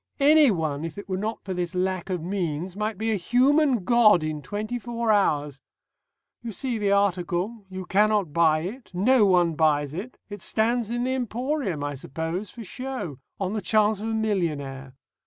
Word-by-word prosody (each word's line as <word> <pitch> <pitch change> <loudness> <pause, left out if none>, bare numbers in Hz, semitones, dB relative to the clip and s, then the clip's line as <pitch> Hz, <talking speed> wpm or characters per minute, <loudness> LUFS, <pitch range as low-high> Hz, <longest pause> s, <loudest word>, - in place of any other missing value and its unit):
Anyone, 215 - +4
if 165 +2 -6
it 205 - -8
were 190 - -2
not 215 +3 -4
for 190 - -3
this 180 0 -3
lack 185 0 -1
of 180 -4 -2
means, 175 -1 -3
might 210 0 -2
be 220 +2 -1
a 215 - +1
human 255 - +3
god 215 -5 +5
in 155 -1 -3
twenty 215 +7 -4
four 235 -1 -1
hours.... 150 -9 +1 0.8
You 235 -1 -5
see 235 +2 -3
the 205 -1 +1
article. 200 +2 0
You 185 0 -6
cannot 205 -4 +2
buy 160 -2 +3
it. 225 +9 -7
No 215 +3 +4
one 175 -3 +3
buys 150 -2 +1
it. 205 +10 -6
It 205 -2 -8
stands 230 +2 0
in 240 +1 -1
the 260 +1 0
emporium, 245 - -2
I 145 0 -2
suppose, 160 +8 -4
for 235 - -9
show 250 - -6 0.2
on 195 0 -2
the 215 - -2
chance 210 +2 +2
of 220 - -3
a 225 - -1
millionaire. 145 -11 -2
200 Hz, 180 wpm, -25 LUFS, 170-230 Hz, 0.8 s, god